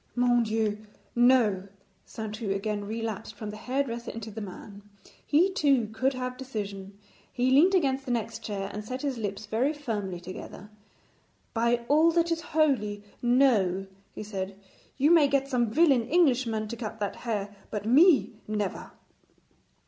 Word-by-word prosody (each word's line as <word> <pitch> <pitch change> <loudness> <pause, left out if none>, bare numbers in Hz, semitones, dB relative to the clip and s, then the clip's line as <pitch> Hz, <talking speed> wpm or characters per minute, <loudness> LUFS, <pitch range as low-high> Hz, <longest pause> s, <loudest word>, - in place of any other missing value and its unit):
'Mon 245 -1 +3
Dieu, 215 -2 0 0.4
no!' 240 -6 +4 0.4
Saintou 220 -1 -5
again 205 +1 -2
relapsed 220 0 -5
from 215 -2 -6
the - - -8
hairdresser 240 0 -3
into 225 -1 -7
the 220 +2 -7
man. 200 +1 -9 0.4
He 360 +6 +3
too 270 - +2
could 260 +5 +1
have 255 0 -4
decision. 200 -6 -6 0.3
He 255 +1 +1
leant 340 +9 +6
against 270 -6 +1
the 255 - -3
next 230 -1 -2
chair 200 -2 -4
and 210 - -5
set 255 +6 -6
his 270 -4 -2
lips 205 -1 -4
very 235 +8 0
firmly 210 - -4
together. 185 +3 -9 0.8
'By 235 +1 +1
all 310 +3 +5
that 335 0 +2
is 330 0 0
holy, 255 -12 0 0.2
no,' 235 -7 +3 0.3
he - - -5
said; 195 -2 -5 0.4
'you 285 +4 +4
may 325 -4 +6
get 275 -1 +1
some 245 -4 +1
villain 265 -2 +3
Englishman 250 -10 +2
to 235 - -4
cut 225 -2 -6
that 205 -2 -3
hair, 205 -4 -3
but 210 -1 -4
me, 290 +5 +5 0.2
never.' 210 -2 -3
230 Hz, 155 wpm, -28 LUFS, 210-265 Hz, 0.8 s, leant